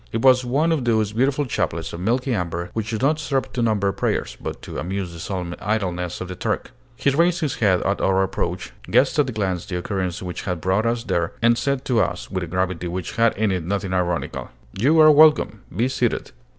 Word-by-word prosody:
It 115 - -2
was 130 -1 +6
one 140 +7 +1
of 155 -5 +1
those 110 -3 +1
beautiful 135 +5 +1
chaplets 85 -9 -2
of 85 - -5
milky 125 +7 0
amber 85 -2 -3
which 110 -1 -3
do 110 - -1
not 150 +6 +1
serve 140 -3 -2
to 125 - -1
number 105 -4 +2
prayers, - - -2
but - - -5
to - - -6
amuse 90 +2 -3
the 85 - -9
solemn 90 -1 -4
idleness 90 -5 -2
of 95 - -5
the 90 - -6
Turk. - - -2 0.2
He 140 - +1
raised 170 +5 +2
his 150 -4 -1
head 95 -5 +2
at 100 +1 0
our 95 0 +3
approach, 60 -8 -3 0.2
guessed - - +3
at 140 -3 +3
a - - -2
glance 95 -4 -2
the 90 -4 -3
occurrence 95 -1 -3
which 90 -1 -5
had 90 -3 -3
brought 95 +6 +1
us 115 0 0
there, 85 -5 -1
and 120 0 +5
said 130 +3 -1
to 120 -4 +2
us, 90 0 -3
with 95 -2 -2
a - - -5
gravity 90 0 -1
which 90 +4 -5
had 115 -2 +3
in 110 -1 +1
it 90 -3 -1
nothing 95 +2 -2
ironical, 90 -2 -2 0.2
"You 140 +11 +3
are 155 0 +9
welcome! 150 -9 +5 0.2
Be 120 +3 +2
seated." 125 -2 -1
105 Hz, 225 wpm, -22 LUFS, 90-125 Hz, 0.2 s, are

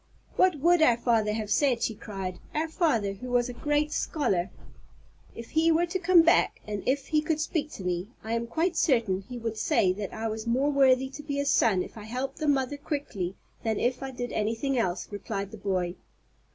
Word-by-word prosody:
"What 370 -2 +4
would 345 +1 +4
our 245 -7 +5
father 230 -3 +2
have 215 -1 -3
said," 260 -5 +2
she 225 - 0
cried; 195 -3 -6 0.2
"our 310 +2 0
father, 235 - +1
who 250 +6 -8
was 245 0 +2
a - - -5
great 295 +3 0
scholar?" 195 - 0 0.9
"If 230 - -9
he 325 +1 +3
were 330 +2 +3
to 350 +2 -3
come 345 -1 +6
back, 335 +2 +3
and 205 -2 -4
if 270 +1 0
he 305 -1 +3
could 310 0 -1
speak 310 -1 -1
to 190 - -8
me, 180 +1 -2 0.2
I 220 +1 -3
am 230 0 -1
quite 330 +8 0
certain 230 - +2
he 250 - -5
would 225 -2 -4
say 185 -3 +2
that 200 0 -5
I 225 +1 -3
was 220 +1 -4
more 265 +5 +2
worthy 265 -2 +4
to 285 +2 -9
be 290 -1 -4
his 280 0 +1
son 195 -6 +3
if 225 - -10
I 210 - -9
helped 250 +4 -4
the 310 - -1
mother 275 0 +1
quickly 280 - -4 0.3
than 220 -2 0
if 250 +1 0
I 270 - -4
did 245 -2 -5
anything 225 +6 -1
else," 185 -7 -1
replied 200 -1 -4
the 220 - -8
boy. 185 -3 -1
245 Hz, 215 wpm, -28 LUFS, 210-295 Hz, 0.9 s, come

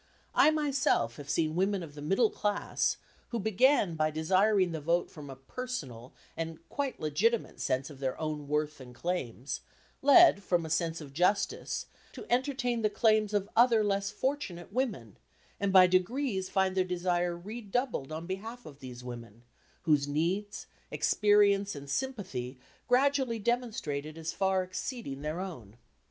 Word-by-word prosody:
I - - +6
myself 275 - +1
have 145 -1 -9
seen 155 +2 +1
women 190 +1 +1
of 150 -3 -10
the 145 - -9
middle 195 +9 +2
class, 205 0 0 0.3
who 235 - -2
began 220 -1 +3
by 155 -1 +1
desiring 185 +4 +2
the 160 -2 -4
vote 170 +3 0
from 145 -3 -10
a 135 - -7
personal 135 - -6 0.2
and 165 -1 -4
quite 280 -2 -3
legitimate 210 +10 0
sense 130 +3 -1
of 140 - -12
their 130 -2 -2
own 150 -2 -3
worth 150 +1 -1
and 125 -1 -12
claims, 135 -6 -3 0.4
led, 285 - +7
from 175 -4 0
a 160 - -6
sense 165 +1 0
of 140 -2 -10
justice, 180 +6 0 0.3
to - - -9
entertain 250 -2 0
the 215 - +2
claims 215 -1 +3
of 205 -2 0
other 230 -2 +5
less 200 -1 0
fortunate 210 -7 -3
women, 205 - -2 0.4
and 200 -1 0
by 185 -1 +8
degrees 190 +2 0
find 190 -1 +1
their 185 - +3
desire 175 -1 -1
redoubled 210 - -3
on 160 +2 -5
behalf 220 +6 -6
of 145 -2 -11
these 125 -2 -9
women, 120 -2 -9 0.4
whose 150 -4 +3
needs, 175 +8 -1 0.2
experience 205 -2 +3
and 140 -1 -7
sympathy 145 - -3 0.3
gradually 260 -1 +2
demonstrated 205 - -2
as 165 0 -4
far 190 -1 +1
exceeding 185 - -5
their 155 +3 -3
own. 125 - -7
185 Hz, 155 wpm, -30 LUFS, 150-220 Hz, 0.4 s, by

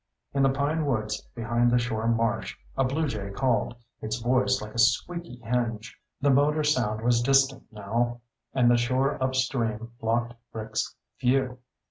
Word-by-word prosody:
In 140 - +1
the 135 - +5
pine 145 +3 0
woods 110 -5 -1
behind 120 +1 +1
the 120 - +4
shore 115 -2 -1
marsh, 115 -1 0 0.2
a 135 - +2
bluejay 130 -7 -1
called, 125 -2 +1 0.3
its 110 0 -2
voice 125 +2 +2
like 105 0 -8
a 115 - -4
squeaky 170 +6 +1
hinge. 115 -2 -2 0.2
The 140 0 +3
motor 150 +3 +3
sound 120 -8 +1
was 120 0 +3
distant 135 +1 +2
now, 115 +3 -2 0.3
and 120 -2 +4
the 120 - +5
shore 130 +3 +1
upstream 120 -4 -1
blocked 120 +1 0 0.2
Rick's 110 -1 -3 0.2
view. 125 0 +1
120 Hz, 150 wpm, -27 LUFS, 115-135 Hz, 0.3 s, the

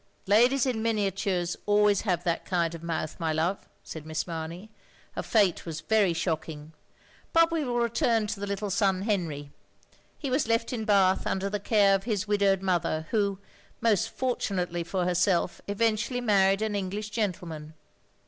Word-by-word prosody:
"Ladies 240 +6 +4
in 245 -4 -1
miniatures 195 -5 0
always 205 -1 +4
have 180 -5 -1
that 170 -2 -1
kind 170 -3 0
of 165 - -8
mouth, 165 -1 -4
my 165 -2 0
love," 165 +5 -1
said 160 - -8
Miss 155 0 -3
Mamey. 170 +5 -6 0.4
"Her - - -4
fate 200 -6 +2
was 160 -2 -6
very 215 -4 +2
shocking. 160 -2 -4 0.6
But 330 0 +5
we 325 -2 0
will 245 -3 -2
return 235 -1 +1
to 210 -1 -4
the 200 - -4
little 200 0 -3
son 195 -2 +1
Henry. 165 -9 -2 0.7
He 275 -4 -4
was 265 -2 +1
left 230 +2 0
in 220 -3 -3
Bath 195 -3 +3
under 195 +1 -1
the 210 - -1
care 200 -1 +3
of 195 +1 0
his 210 -4 -1
widowed 200 -2 +2
mother, 170 -4 0
who, 200 -3 +1 0.4
most 225 -1 +2
fortunately 185 -10 -2
for 180 +1 -2
herself, 180 0 +1
eventually 220 +4 0
married 195 -3 +3
an 215 -1 -1
English 205 +2 -3
gentleman." 170 -8 -4
195 Hz, 165 wpm, -27 LUFS, 175-220 Hz, 0.7 s, But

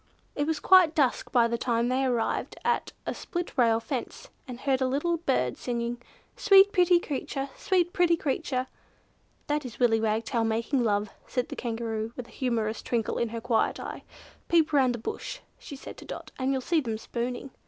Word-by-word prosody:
It 290 0 -1
was 320 -2 0
quite 360 -3 +6
dusk 275 -5 +1
by 235 -2 +4
the 235 0 -2
time 235 -1 +1
they 255 +2 +1
arrived 245 -3 -1
at - - +1
a - - -2
split 350 -3 -5
rail 230 -4 +4
fence, 235 +2 -5 0.2
and 250 -1 -7
heard 270 -2 +1
a 260 - +3
little 295 +6 0
bird 265 - 0
singing, 240 0 -3 0.3
"Sweet 400 -5 +6
pretty 355 -2 +5
creature! 275 -3 -4
Sweet 355 -2 +1
pretty 345 -2 +3
creature!" 260 -3 -1 0.8
"That 295 0 -1
is 250 -4 -8
Willy 225 -3 +3
Wagtail 225 +1 0
making 230 +4 0
love," 205 -2 0 0.2
said 250 -1 -2
the - - -5
Kangaroo, 225 -1 -3
with 250 - -6
a - - -17
humorous 225 -4 -1
twinkle 230 -3 -1
in 235 - 0
her 230 +1 -4
quiet 240 -1 +1
eyes. - - -6 0.5
"Peep 325 -2 +3
round 260 -4 +4
the - - -5
bush," - - -5 0.2
she 285 - -9
said 270 - -10
to - - -11
Dot, - - -8
"and 260 +1 +1
you'll 265 -1 0
see 325 +4 +1
them 225 -5 -3
spooning." 245 +4 -4
255 Hz, 190 wpm, -28 LUFS, 230-300 Hz, 0.8 s, quite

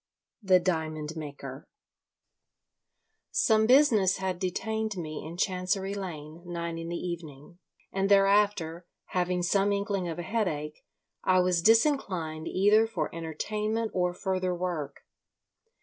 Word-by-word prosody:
THE 190 -3 +5
DIAMOND 160 -3 -2
MAKER 140 -3 -8 1.6
Some 220 -1 +3
business 230 -8 +5
had 190 -2 -2
detained 220 +3 -2
me 155 -3 -5
in 165 +2 -8
Chancery 190 +1 -1
Lane 160 -6 -6
until 175 0 -9
nine 170 -1 -3
in 165 0 -5
the 175 - -3
evening, 170 -2 -7 0.3
and 195 0 0
thereafter, 195 -4 +3 0.2
having 180 0 0
some 195 +3 +2
inkling 200 -2 -1
of 165 - -5
a 175 - -4
headache, 155 -7 -2 0.4
I 185 0 +4
was 180 -1 +2
disinclined 190 - +2
either 210 +4 +4
for 170 -9 -3
entertainment 210 +7 -2
or 180 -1 +1
further 185 0 -1
work. 175 -5 -4
180 Hz, 125 wpm, -28 LUFS, 165-200 Hz, 1.6 s, THE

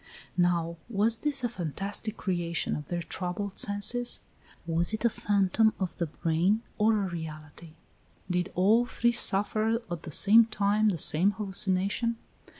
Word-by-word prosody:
Now, 170 -2 0
was 220 +1 +2
this 280 -2 0
a - - +2
fantastic 200 +2 -5
creation 175 -3 -2
of 150 - -7
their 175 -1 -3
troubled 185 +3 -4
senses? 230 +4 -1 0.4
Was 170 +4 0
it 220 +2 -2
a 235 - +3
phantom 205 +1 +1
of 185 -3 -3
the 170 - -2
brain, 170 +8 0 0.2
or 215 -1 +3
a - - -2
reality? 160 -1 -8 0.5
Did 180 -1 -1
all 210 +6 +4
three 240 -1 0
suffer 220 0 +3
at 170 -2 -4
the 165 - -8
same 215 +9 +6
time 210 0 +1
the 185 - -1
same 175 +6 +3
hallucination? 200 +3 0
195 Hz, 150 wpm, -28 LUFS, 175-220 Hz, 0.5 s, same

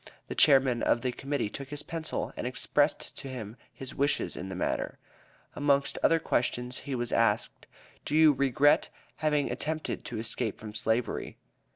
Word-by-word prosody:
the - - -2
Chairman 130 -4 +5
of 120 - +2
the 125 - 0
Committee 135 -1 -2
took 140 -2 -7
his 145 0 -4
pencil 165 -2 -4
and - - -3
expressed 145 +4 0
to 140 - -7
him 115 -5 -6 0.2
his 135 -1 -8
wishes 140 +2 0
in 95 - -6
the 95 - -5
matter. 90 - -2 0.6
Amongst 140 -1 +1
other 165 - +5
questions, 125 -5 -1
he 140 - -4
was 120 -1 -3
asked: - - +1 0.4
"Do 150 - -2
you 155 -1 +7
regret 140 +1 +3 0.3
having 150 -2 +1
attempted 155 +1 -3
to 120 - -5
escape 115 0 -2
from 105 -1 -8
slavery?" 110 +2 -1
135 Hz, 165 wpm, -29 LUFS, 120-145 Hz, 0.6 s, you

